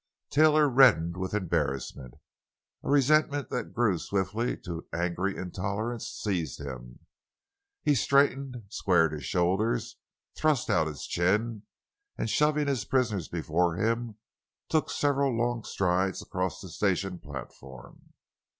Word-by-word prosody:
Taylor 155 0 +5
reddened 120 - +5
with 95 +2 -3
embarrassment. 70 -8 -2 0.7
A - - -4
resentment 145 0 +3
that 125 - -3
grew 110 -7 +1
swiftly 100 +6 -1
to 85 -1 -5
an - - -3
angry 90 +3 -1
intolerance, 100 +6 -3
seized 85 - -3
him. 65 -4 -9 0.8
He 145 - +4
straightened, 135 -2 +2
squared 90 -6 +2
his 75 -4 -6
shoulders, 95 - 0 0.4
thrust 155 -7 +1
out 80 -2 +3
his 75 -3 -6
chin, 105 +4 0 0.5
and - - -2
shoving 150 0 +2
his 135 -4 0
prisoners 110 - 0
before 85 +1 0
him, 115 +3 -1 0.5
took 155 - +1
several 140 -3 +1
long 120 -1 0
strides 95 0 0
across 90 -2 -3
the 95 - -9
station 95 -1 -1
platform. 65 -2 -11
100 Hz, 125 wpm, -28 LUFS, 85-125 Hz, 0.8 s, Taylor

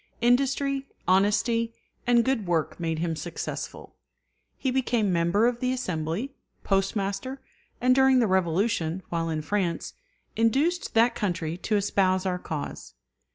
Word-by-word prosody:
Industry, 275 +3 +2 0.2
honesty, 225 +5 +2 0.3
and 240 -1 +4
good 255 -7 0
work 165 -1 0
made 165 -2 -1
him 165 0 -1
successful. 170 +1 -6 0.6
He 265 - -1
became 240 -6 +1
member 170 +6 +2
of 240 0 +1
the 255 0 0
Assembly, 185 - -3 0.3
Postmaster, 195 +6 -1 0.4
and 250 +1 +4
during 265 0 +5
the 245 - +4
Revolution, 185 -1 +1
while 165 -1 -1
in 155 -1 -2
France, 180 -1 -1 0.4
induced 275 +11 +1
that 230 +2 +5
country 170 -5 -2
to 210 +4 -1
espouse 190 -2 +2
our 180 -1 -1
cause. 150 - -6
205 Hz, 130 wpm, -26 LUFS, 175-245 Hz, 0.6 s, during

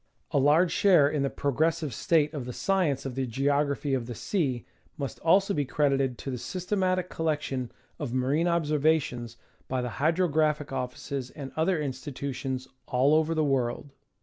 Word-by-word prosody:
A 140 - +3
large 155 +6 +4
share 180 -8 +5
in 145 0 -1
the 140 - +1
progressive 150 +2 0
state 155 -2 +2
of 140 -5 -4
the 125 - -5
science 170 -8 0
of 135 - -3
the 130 0 -2
Geography 140 +3 0
of 125 -3 -1
the 120 - -5
Sea 135 - -1 0.3
must 140 -2 -5
also 195 +4 +3
be 145 - +1
credited 135 -2 +1
to 135 - -5
the 125 - -4
systematic 185 - -1
collection 150 -7 -2 0.3
of 145 -6 -3
marine 135 +7 +1
observations 150 -7 +1 0.3
by 130 - -1
the 125 - -2
Hydrographic 155 -3 +1
Offices 130 +1 -4
and 135 -1 -8
other 160 +2 +1
institutions 135 -2 -4 0.2
all 130 +4 +3
over 160 +1 +2
the 155 - +2
world. 135 0 -1
145 Hz, 160 wpm, -28 LUFS, 130-160 Hz, 0.3 s, share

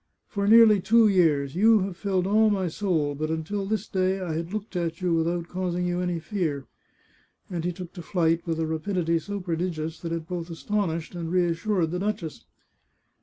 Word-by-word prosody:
For 200 -2 -2
nearly 220 -2 +7
two 230 +3 +5
years 155 -8 +2
you 215 +3 +5
have 190 -1 -3
filled 190 -1 -1
all 215 +3 +4
my 195 -3 0
soul, 160 -5 0
but 155 +2 -3
until 175 +5 -2
this 215 0 -2
day 190 0 0
I 180 -4 -3
had 165 +2 -4
looked 210 -1 -5
at 170 -2 -2
you 180 -2 0
without 170 +1 0
causing 180 -1 -2
you 175 0 -1
any 180 -1 -1
fear," 160 -7 -2 0.9
and 170 -2 -3
he 180 - 0
took 175 0 -9
to 180 - -8
flight 165 -1 +1
with 165 -1 -1
a 165 - +1
rapidity 165 +1 0
so 200 +6 -5
prodigious 165 -3 -3
that 165 - -5
it 165 -1 -3
both 175 -1 -4
astonished 170 -2 -2
and 170 -2 -5
reassured 175 0 +1
the 180 - -2
duchess. 195 -5 -3
175 Hz, 190 wpm, -26 LUFS, 165-195 Hz, 0.9 s, nearly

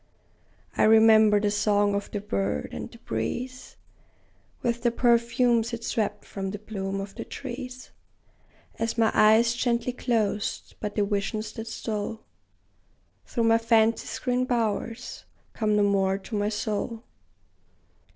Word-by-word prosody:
I - - +3
remember 220 -1 +6
the 205 0 0
song 205 0 +2
of 200 0 -2
the 205 - -4
bird, 100 - -2
and - - -6
the - - -14
breeze 245 - -5 0.9
With 235 0 0
the 240 - +3
perfumes 235 0 +2
it 230 0 -5
swept 210 -3 -2
from 195 -1 -5
the 205 - -5
bloom 195 -2 -4
of 195 0 -6
the - - -6
trees, 255 -1 -8 0.9
As 225 +1 -1
my 225 -1 +3
eyes 220 +2 +5
gently 240 0 0
closed; 225 -4 -1
but 210 -1 -4
the 205 - +2
visions 210 +1 -2
that 225 0 -7
stole 220 0 -4 1.0
Through 235 - -1
my 225 0 +4
fancy's 225 0 +2
green 250 0 0
bowers, 230 0 -2 0.3
come 215 -2 +1
no 210 - +3
more 195 -1 +2
to 200 +3 -7
my 205 0 +1
soul! 220 +2 -3
220 Hz, 140 wpm, -26 LUFS, 205-235 Hz, 1.0 s, remember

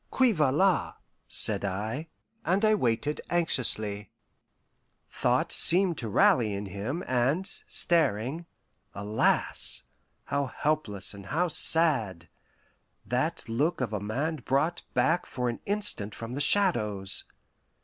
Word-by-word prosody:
"Qui 260 -2 +3
va 155 -9 +2
la?" 185 +5 +1 0.3
said - - +1
I, 110 - -3 0.4
and 195 +3 +1
I 215 - +4
waited 145 - 0
anxiously. 110 - -1 1.0
Thought - - 0
seemed 180 -1 +2
to 115 - -4
rally 120 - +3
in 100 +1 -5
him, 105 - -5
and, 130 +9 0 0.2
staring 155 0 0 0.5
alas! 105 +2 +2 0.4
how 140 0 -2
helpless 125 -10 -2
and 100 -1 -11
how 175 - 0
sad: 120 - +3 0.8
that - - -2
look 150 +9 0
of 120 -5 -3
a 105 - -1
man 135 +11 -2
brought 145 +6 -1
back 175 +2 +1
for 125 -1 -2
an 120 - -5
instant 200 - -2
from 115 +1 -7
the 140 - -3
Shadows! 105 - +1
135 Hz, 120 wpm, -28 LUFS, 105-170 Hz, 1.0 s, I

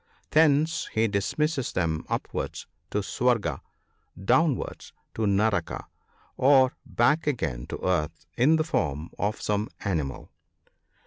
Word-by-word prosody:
Thence 155 +1 +3
he 110 +1 +3
dismisses 135 +8 -1
them 80 -3 -1
upwards - - -3 0.2
to 105 - -1
Swarga, 115 - 0 0.6
downwards 135 +4 +1 0.2
to 110 -1 0
Naraka, 100 -3 +1 0.5
or 130 -1 +5
back 150 +8 +2
again 65 - -1
to - - -5
earth 80 -5 -1
in 140 +7 +4
the 160 - +2
form 75 - -2
of 105 +2 -1
some 105 +1 -1 0.2
animal. 80 -9 -2
110 Hz, 115 wpm, -27 LUFS, 90-145 Hz, 0.6 s, or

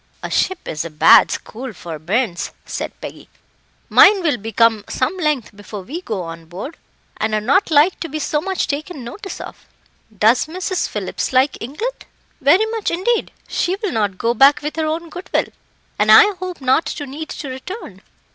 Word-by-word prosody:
"A - - -4
ship 375 -1 0
is 155 - -3
a 170 - -6
bad 150 -1 +6
school 245 +2 -6
for 165 -3 -8
bairns," 185 - -1 0.2
said - - -5
Peggy. - - -9 0.6
"Mine 395 -2 +6
will 300 -6 +2
be 220 +2 -6
come 225 -1 +3
some 260 +8 -1
length 300 - -1
before 205 -1 -8
we 305 - -6
go 215 - -4
on 165 0 -8
board, 190 - -8 0.4
and 215 0 0
are - - +2
not 275 - +2
like 310 +4 +4
to 330 - -4
be 310 - -4
so 300 0 -1
much 380 +1 -1
taken 295 0 -4
notice 390 - -7
of. - - -10 0.5
Does 225 +8 +4
Mrs. 365 +2 -2
Phillips 205 -3 -3
like 260 +2 +3
England?" 380 - -5 0.4
"Very 335 +10 +5
much, 450 -2 -1
indeed. 390 +8 0 0.2
She 360 +2 0
will 405 -1 -3
not 205 -4 -1
go 230 +4 +1
back 275 +5 +5
with 300 +1 -3
her 315 -1 0
own 330 +2 -3
goodwill, 360 +2 -2 0.5
and - - +4
I 420 -1 +8
hope 365 -4 -6
not 260 +5 +3
to 290 - -4
need 290 +3 -7
to 285 - -6
return." 260 - -8
285 Hz, 185 wpm, -19 LUFS, 220-355 Hz, 0.6 s, I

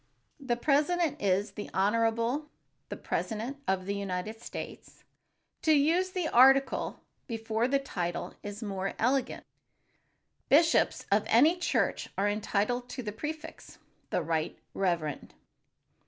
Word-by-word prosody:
The 260 -4 -1
president 300 +5 +1
is 200 +1 +1
"The 205 +1 -7
Honorable, 230 +8 +1 0.4
the - - -5
President 230 +5 -3
of 190 -1 0
the 200 - -2
United 200 +2 -4
States." - - -8 0.6
To 315 - +4
use 330 +6 +3
the 365 -3 -2
article 270 +2 +4 0.3
before 225 -1 -1
the 275 +1 +2
title 180 -11 -4
is 205 +2 -7
more 195 -2 -3
elegant. 260 +3 0 1.1
Bishops 325 +4 +4
of 205 +1 +3
any 300 +9 +5
church 355 - 0
are 200 - +2
entitled 215 +4 -1
to 255 - -5
the 210 - -3
prefix, 305 +8 -7 0.3
"The 175 - 0
Right 160 0 -1 0.2
Reverend." 170 -6 -2
230 Hz, 125 wpm, -30 LUFS, 200-280 Hz, 1.1 s, any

